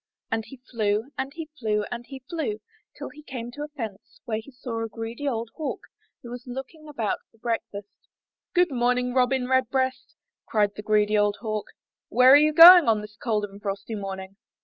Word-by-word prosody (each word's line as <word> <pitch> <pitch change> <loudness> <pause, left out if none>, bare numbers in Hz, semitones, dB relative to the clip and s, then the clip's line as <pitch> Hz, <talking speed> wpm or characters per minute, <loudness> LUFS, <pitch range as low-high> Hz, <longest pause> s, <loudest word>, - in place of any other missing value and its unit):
And 225 0 0
he 270 - -12
flew, 220 +2 0
and 265 +1 -3
he 325 -1 -5
flew, 210 -3 0
and 240 0 -5
he 265 -2 -10
flew, 355 +6 -3 0.4
till - - -6
he 300 - -14
came 245 -5 -7
to 290 - -9
a 295 - -3
fence 255 - -8
where 220 -1 -2
sat 250 0 -10
a 225 0 -2
greedy 230 +6 -6
old 230 -3 -2
Hawk 310 - -4 0.4
who 240 - -9
was 245 +1 -8
looking 270 +5 -8
about 230 -8 -2
for - - -28
breakfast. 220 -3 -4 0.7
''Good 355 -2 +4
morning, 250 0 +1
Robin 255 0 +2
Redbreast," 260 0 0 0.3
cried 205 -2 +1
the 210 - -8
greedy 210 0 +2
old 205 0 +1
Hawk, 215 -2 -3 0.4
''where 250 +3 +6
are - - +10
you 305 +1 +5
going 340 +1 +10
on 220 -2 +3
this 210 0 -11
cold 215 -2 -1
and 200 0 -13
frosty 200 +2 -4
morning?" 195 -1 -6
240 Hz, 190 wpm, -25 LUFS, 215-270 Hz, 0.7 s, are